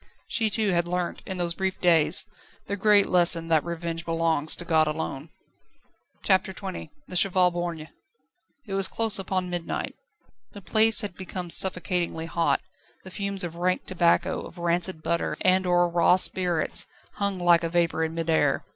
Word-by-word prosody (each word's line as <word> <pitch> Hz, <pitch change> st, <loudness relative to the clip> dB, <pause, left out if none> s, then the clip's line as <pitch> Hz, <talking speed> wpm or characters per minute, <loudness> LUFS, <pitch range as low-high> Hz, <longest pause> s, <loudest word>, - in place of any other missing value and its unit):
She 225 Hz, -2 st, 0 dB
too 210 Hz, 0 st, 0 dB
had 170 Hz, -1 st, 0 dB
learnt 180 Hz, 0 st, -3 dB
in 190 Hz, -, -5 dB
those 175 Hz, -1 st, -1 dB
brief 190 Hz, +1 st, -3 dB
days 165 Hz, -1 st, +3 dB, 0.4 s
the 200 Hz, -, -3 dB
great 205 Hz, 0 st, +4 dB
lesson 170 Hz, -2 st, +4 dB
that 160 Hz, -2 st, +3 dB
revenge 170 Hz, -1 st, -5 dB
belongs 165 Hz, -2 st, +1 dB
to 175 Hz, -, -6 dB
God 160 Hz, -2 st, +2 dB
alone. 150 Hz, -1 st, -5 dB, 0.9 s
CHAPTER 190 Hz, -1 st, +1 dB
XX 190 Hz, -1 st, -7 dB, 0.2 s
The 180 Hz, -, -9 dB
Cheval 180 Hz, -1 st, +3 dB
Borgne. 170 Hz, -3 st, -5 dB, 0.8 s
It 200 Hz, -, -7 dB
was 195 Hz, 0 st, +2 dB
close 225 Hz, -3 st, 0 dB
upon 185 Hz, -1 st, -3 dB
midnight. 175 Hz, -1 st, -4 dB, 0.6 s
The 205 Hz, -, -10 dB
place 220 Hz, +3 st, +4 dB
had 205 Hz, -4 st, -5 dB
become 180 Hz, -2 st, -5 dB
suffocatingly 180 Hz, -3 st, +1 dB
hot; 165 Hz, 0 st, 0 dB, 0.4 s
the 185 Hz, -, -11 dB
fumes 200 Hz, 0 st, -1 dB
of 170 Hz, -1 st, -6 dB
rank 180 Hz, +1 st, -1 dB
tobacco, 175 Hz, 0 st, +1 dB
of -, -, -11 dB
rancid 170 Hz, -1 st, -1 dB
butter, 170 Hz, -, -2 dB
and 185 Hz, 0 st, +2 dB
of -, -, 0 dB, 0.2 s
raw 175 Hz, +1 st, +4 dB
spirits 180 Hz, -3 st, +1 dB, 0.3 s
hung 200 Hz, -1 st, -1 dB
like 175 Hz, -1 st, +3 dB
a 165 Hz, -, -1 dB
vapour 170 Hz, -1 st, 0 dB
in 160 Hz, 0 st, -3 dB
mid 165 Hz, -1 st, -3 dB
air. 150 Hz, -4 st, +1 dB
175 Hz, 165 wpm, -25 LUFS, 165-190 Hz, 0.9 s, great